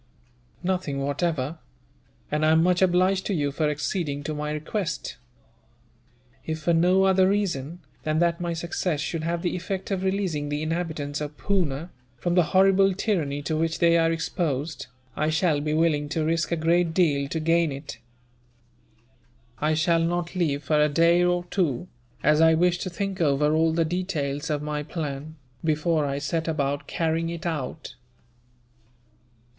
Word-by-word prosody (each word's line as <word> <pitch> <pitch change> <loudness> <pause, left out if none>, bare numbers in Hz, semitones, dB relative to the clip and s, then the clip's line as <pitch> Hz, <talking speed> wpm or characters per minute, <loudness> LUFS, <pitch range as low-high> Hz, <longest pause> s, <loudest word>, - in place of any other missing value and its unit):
"Nothing, 180 -6 -1
whatever; 145 +1 -1 0.7
and 150 +1 0
I 155 0 +5
am 160 0 +4
much 180 +1 +2
obliged 185 +1 +3
to 200 - 0
you 145 -3 0
for 150 +1 0
acceding 150 -1 -2
to 155 - -3
my 150 0 -3
request. 165 +4 -3 1.3
If 160 0 -4
for 170 - +2
no 180 +3 +4
other 190 -1 +4
reason 175 -5 -1 0.2
than 155 0 -1
that 170 +1 +1
my 170 -1 -1
success 170 -1 -2
should 160 +1 -2
have 170 +2 -2
the 175 - -1
effect 185 +2 -4
of 190 -2 0
releasing 190 -7 -1
the 145 +1 -2
inhabitants 155 -3 -3
of 150 0 -5
Poona, 170 -5 -1 0.3
from 175 +8 -1
the 175 -2 +4
horrible 195 0 +5
tyranny 155 -9 -1
to 155 - -1
which 165 +1 0
they 170 0 +4
are 165 0 +3
exposed, 160 -2 -2 0.3
I 155 - 0
shall 160 -2 +1
be 150 +1 -1
willing 155 -3 +1
to 155 +1 -1
risk 165 +2 0
a - - +2
great 165 +1 +1
deal 145 -6 +2
to 160 - -2
gain 165 0 +2
it. 140 +2 -7 1.6
"I 155 +1 +1
shall 165 +2 +2
not 170 +1 -1
leave 150 -5 0
for 150 +1 +2
a 150 - +3
day 170 +3 +4
or 175 0 +1
two, 175 -4 0 0.4
as 150 +2 +4
I 160 0 +6
wish 175 +1 +2
to 185 - -3
think 195 +1 -3
over 150 0 +2
all 160 +1 +3
the 165 0 +1
details 160 -4 -2
of 150 -1 -1
my 150 0 -2
plan, 150 -1 -5 0.3
before 155 -1 +1
I 140 0 -2
set 160 +3 -2
about 145 -3 -1
carrying 165 0 -1
it 170 0 -6
out." 155 -3 -4
165 Hz, 165 wpm, -25 LUFS, 150-175 Hz, 1.6 s, I